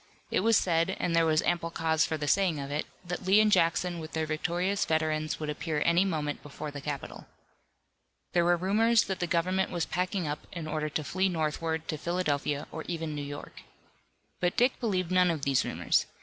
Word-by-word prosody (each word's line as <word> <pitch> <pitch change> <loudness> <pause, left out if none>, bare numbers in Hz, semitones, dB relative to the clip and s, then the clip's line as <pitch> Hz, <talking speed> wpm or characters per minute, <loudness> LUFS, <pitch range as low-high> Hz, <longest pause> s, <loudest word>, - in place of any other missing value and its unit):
It - - +2
was 225 +2 +4
said, 170 +1 +1
and 170 - 0
there 165 -1 +4
was 155 -1 +3
ample 170 -1 0
cause 160 -1 +1
for 160 - -2
the 150 -1 -3
saying 180 -2 +2
of 140 0 -5
it, 150 +1 -2 0.2
that 180 +2 -4
Lee 190 +3 +5
and 215 -1 +4
Jackson 175 -1 +2
with 160 0 -8
their 160 0 0
victorious 175 +5 0
veterans 155 -1 0
would 155 - -3
appear 150 0 -2
any 170 +3 +4
moment 150 -5 -2
before 145 +1 -7
the 145 -1 -7
capital. 140 -1 -6 1.1
There 175 - +4
were 175 0 +3
rumors 220 +6 +3
that 190 -1 -4
the 175 - -1
government 185 +3 +1
was 175 -2 -1
packing 180 -1 -1
up 145 0 -5
in 170 -3 -5
order 155 0 -2
to 155 +1 -2
flee 190 +5 0
northward 160 -1 -2
to 155 - -3
Philadelphia 150 -4 -1
or 160 - -5
even 165 -3 -3
New 145 - -4
York. 145 0 -8 0.8
But 175 0 0
Dick 250 +2 +3
believed 185 -7 -1
none 180 -1 +4
of 160 -4 -2
these 135 -2 +2
rumors. - - +1
165 Hz, 205 wpm, -29 LUFS, 155-185 Hz, 1.1 s, Lee